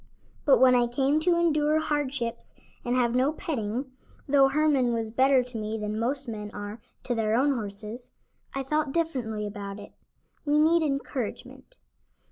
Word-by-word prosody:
But 280 - +6
when 255 -1 +6
I 245 -1 +3
came 270 +5 +1
to 340 +2 +2
endure 305 -2 +2
hardships 285 -6 -3 0.3
and 245 +1 0
have 240 -2 +2
no 260 +4 +2
petting 260 -4 -3 0.4
(though 275 -1 +5
Herman 275 -4 +2
was 225 -1 -3
better 260 +2 +4
to 245 -2 -8
me 215 +1 -3
than 210 0 -3
most 265 +4 -1
men 210 -2 -5
are 205 +2 -7 0.2
to 245 - -1
their 220 -1 +1
own 280 +4 +3
horses) 215 +1 -5 0.5
I 270 - -1
felt 300 +1 -1
differently 250 -11 -1
about 200 -1 -6
it. 205 - -11 0.5
We 295 0 +2
need 325 +2 +4
encouragement. 275 - -4
255 Hz, 160 wpm, -27 LUFS, 225-290 Hz, 0.5 s, But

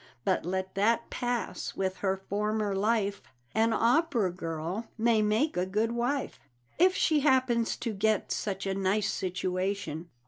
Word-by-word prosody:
But - - +1
let 190 +1 -2
that 225 +4 +1
pass 245 -1 -3
with 190 -1 -1
her 195 -1 0
former 210 0 0
life 205 0 +1 0.3
An 225 +1 +3
opera 235 - +2
girl 170 +5 -4
may 225 -1 +3
make 215 +9 +1
a 180 +1 0
good 215 +4 0
wife, 245 +4 -1 0.4
If 370 +2 +5
she 310 -2 +3
happens 260 -5 +2
to 230 -3 -3
get 215 +1 +1
such 195 -2 -2
a 195 - 0
nice 195 +2 +1
situation. 185 -2 -2
210 Hz, 145 wpm, -29 LUFS, 190-235 Hz, 0.4 s, If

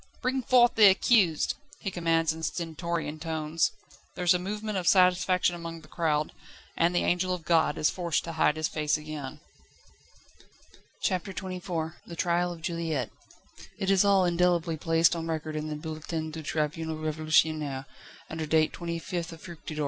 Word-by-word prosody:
"Bring 260 +1 0
forth 245 -1 +5
the 215 -2 +7
accused!" 190 -4 +4 0.2
he 195 - -4
commands 165 -2 +1
in 160 - -9
stentorian 165 -1 -3
tones. 160 0 0 0.4
There 180 - -3
is 175 - +6
a 180 - +1
movement 210 +2 -3
of 175 - -4
satisfaction 180 -1 +4
among 165 -1 -7
the 155 - -16
crowd, 155 -2 0 0.4
and 170 +1 +2
the - - +2
angel 180 +1 +1
of 165 -3 -11
God 160 -2 +3
is 150 - +2
forced 170 -4 -1
to 165 - -5
hide 160 -2 +2
his 155 0 -1
face 150 -1 0
again. 150 -3 -7 1.6
CHAPTER 185 +1 -1
XXIV 180 -4 -4
The 170 - -8
trial 175 +1 +1
of 165 -2 -9
Juliette. 165 - -2 0.7
It 195 0 0
is 195 0 +5
all 200 -2 +4
indelibly 175 -1 +2
placed 165 +2 +3
on 165 -1 -4
record 155 -1 -3
in 155 0 -3
the 155 - -3
"Bulletin 155 +1 -5
du 160 +1 -6
Tribunal 155 +1 -2
Révolutionnaire," 155 -2 +1 0.4
under 160 0 -4
date 155 0 +3
25th 170 0 -4
Fructidor, 165 -2 -9
year - - -8
I. - - -3
165 Hz, 165 wpm, -28 LUFS, 155-180 Hz, 1.6 s, the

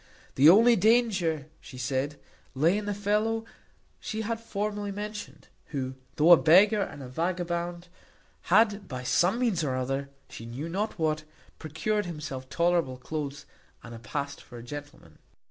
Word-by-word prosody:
The 140 +4 +7
only 230 +6 +7
danger, 200 - +2
she 130 - -12
said, 135 +3 -2 0.4
lay 160 +8 +3
in 210 0 -2
the 205 - -1
fellow 215 +2 0 0.5
she 220 - -4
had 225 +1 -2
formerly 205 -2 -3
mentioned, 210 +1 -7 0.2
who, 130 -3 -4 0.2
though 155 +3 +5
a 175 - +11
beggar 190 +9 +5
and 145 -7 -5
a - - -7
vagabond, 175 +3 -3 0.6
had, 210 +1 +3
by 130 -1 -6
some 175 - +2
means 230 -10 +1
or 135 -3 -1
other, 135 +2 -2 0.2
she 115 - -9
knew 130 +7 -5
not 205 +5 -2
what, 155 -2 0 0.4
procured 185 +6 -2
himself 140 -6 -6
tolerable 170 -5 +1
cloaths, 140 +1 -5 0.4
and 115 -1 -10
past 140 +5 -4
for 120 - -12
a 115 - -9
gentleman. 145 +3 -10
170 Hz, 150 wpm, -28 LUFS, 140-205 Hz, 0.6 s, a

